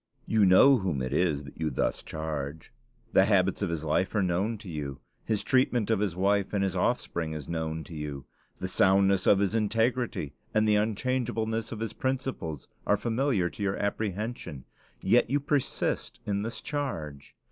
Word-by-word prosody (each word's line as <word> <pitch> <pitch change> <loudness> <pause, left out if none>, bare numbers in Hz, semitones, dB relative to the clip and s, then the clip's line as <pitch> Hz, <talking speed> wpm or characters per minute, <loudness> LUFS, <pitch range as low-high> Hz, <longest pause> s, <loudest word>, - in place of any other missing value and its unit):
You 110 -3 +3
know 130 +9 +7
whom 95 - -1
it 65 - -3
is 80 -5 +1
that 70 - -12
you 80 - +1
thus 65 - -1
charge. 80 -1 -5 0.4
The 95 - +6
habits 95 -2 +2
of 100 - 0
his 85 -2 -3
life 85 +7 0
are 105 - +3
known 95 +6 0
to 105 0 -12
you; 75 -5 -5 0.2
his 110 -3 -1
treatment 125 -4 +2
of 110 - +2
his 100 -5 -1
wife 100 +2 +1
and 100 -1 +1
his 95 -3 -1
offspring 80 -2 -1
is 75 -3 -6
known 80 -1 -3
to 85 - -11
you; 75 -3 -5 0.3
the 95 - -3
soundness 95 0 +3
of 100 - +6
his 100 +1 +1
integrity 115 - 0 0.2
and 110 0 +4
the 105 - +4
unchangeableness 115 0 -1
of 110 - -5
his 115 - -3
principles 130 - -3 0.2
are 105 - +4
familiar 120 -5 +1
to - - -10
your 95 -1 0
apprehension: 100 - -3 0.4
yet - - +4
you 145 +3 +2
persist 145 -1 -1
in 100 -1 -1
this 115 +3 -4
charge! 80 - -4
100 Hz, 180 wpm, -28 LUFS, 80-110 Hz, 0.4 s, know